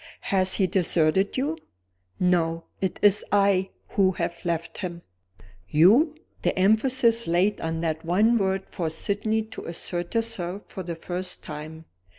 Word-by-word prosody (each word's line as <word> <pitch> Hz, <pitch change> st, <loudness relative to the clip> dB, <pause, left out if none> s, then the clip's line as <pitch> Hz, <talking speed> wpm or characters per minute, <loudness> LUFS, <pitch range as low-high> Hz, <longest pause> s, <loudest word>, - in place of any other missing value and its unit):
"Has 185 Hz, -1 st, +3 dB
he 195 Hz, -, +2 dB
deserted 180 Hz, +2 st, +1 dB
you?" 295 Hz, +5 st, -1 dB, 0.6 s
"No. 165 Hz, -2 st, +1 dB, 0.2 s
It 190 Hz, -2 st, -1 dB
is 205 Hz, 0 st, +5 dB
I 195 Hz, -2 st, +3 dB, 0.2 s
who 190 Hz, -2 st, +2 dB
have 170 Hz, -1 st, -4 dB
left 170 Hz, -2 st, -3 dB
him." 175 Hz, -3 st, -5 dB, 0.7 s
"You!" 230 Hz, -, +5 dB, 0.3 s
The -, -, 0 dB
emphasis 230 Hz, +4 st, +3 dB
laid 180 Hz, +5 st, +2 dB
on 165 Hz, 0 st, -2 dB
that 160 Hz, -1 st, -2 dB
one 210 Hz, +8 st, +3 dB
word 190 Hz, -1 st, -1 dB
forced 160 Hz, -2 st, -4 dB
Sydney 215 Hz, +3 st, 0 dB
to 220 Hz, -, -10 dB
assert 175 Hz, +2 st, -4 dB
herself 205 Hz, -4 st, -2 dB
for 190 Hz, -, -7 dB
the 170 Hz, -2 st, -5 dB
first 180 Hz, +2 st, -5 dB
time. 155 Hz, +2 st, -8 dB
185 Hz, 145 wpm, -25 LUFS, 170-210 Hz, 0.7 s, is